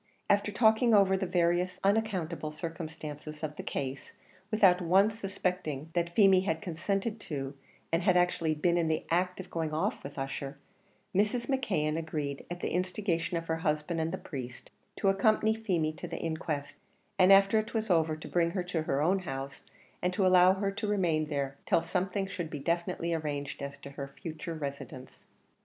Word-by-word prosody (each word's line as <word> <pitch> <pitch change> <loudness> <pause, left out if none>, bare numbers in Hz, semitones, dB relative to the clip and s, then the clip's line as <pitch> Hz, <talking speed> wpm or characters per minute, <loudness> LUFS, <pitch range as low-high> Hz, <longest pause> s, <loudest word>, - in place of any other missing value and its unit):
After 205 +1 +2
talking 220 +2 +4
over 195 -1 +5
the 190 0 -1
various 175 +1 +1
unaccountable 195 -7 0
circumstances 155 -1 -7
of 150 -1 -3
the - - -5
case, 135 0 -4 0.4
without 195 -4 +5
once 195 +6 +3
suspecting 180 -7 -3
that 170 0 -1
Feemy 195 -3 +6
had 165 -4 -1
consented 195 +5 -2
to 140 -8 -4 0.4
and 165 +1 +2
had 180 0 +4
actually 175 -3 +2
been 170 +3 +2
in 165 - +1
the 160 -1 0
act 180 +2 +1
of 185 -1 -8
going 160 -2 -2
off 190 +7 -1
with 140 - -8
Ussher, 135 +1 -4 0.6
Mrs. 210 +5 +1
McKeon 185 - 0
agreed, 150 -3 -4
at 175 0 -6
the - - -2
instigation 180 -2 -1
of 165 - -4
her 160 0 -1
husband 160 0 -1
and 160 +1 -1
the 190 - -2
priest, 125 -8 -8 0.2
to - - -1
accompany 215 +2 +3
Feemy 180 -9 0
to - - -6
the - - -5
inquest, 160 -3 -3 0.4
and 185 +1 +7
after 195 +2 +6
it 220 +2 -5
was 220 -2 0
over 160 -2 +3
to 155 - -9
bring 170 -1 +2
her 180 +1 -2
to 175 -2 -2
her 145 -2 0
own 190 +4 +3
house, 135 -5 -6 0.4
and 180 - +1
to 190 +1 +2
allow 185 0 +7
her 195 +1 -1
to 210 +2 -3
remain 170 -7 +1
there 140 -2 -2
till 165 - +3
something 185 +3 -1
should 180 -4 -5
be 150 - -5
definitely 170 +2 -1
arranged 145 -3 -3
as 140 0 -5
to 140 - -10
her 140 0 -6
future 160 +4 -7
residence. 140 -3 -7
170 Hz, 185 wpm, -30 LUFS, 155-195 Hz, 0.6 s, and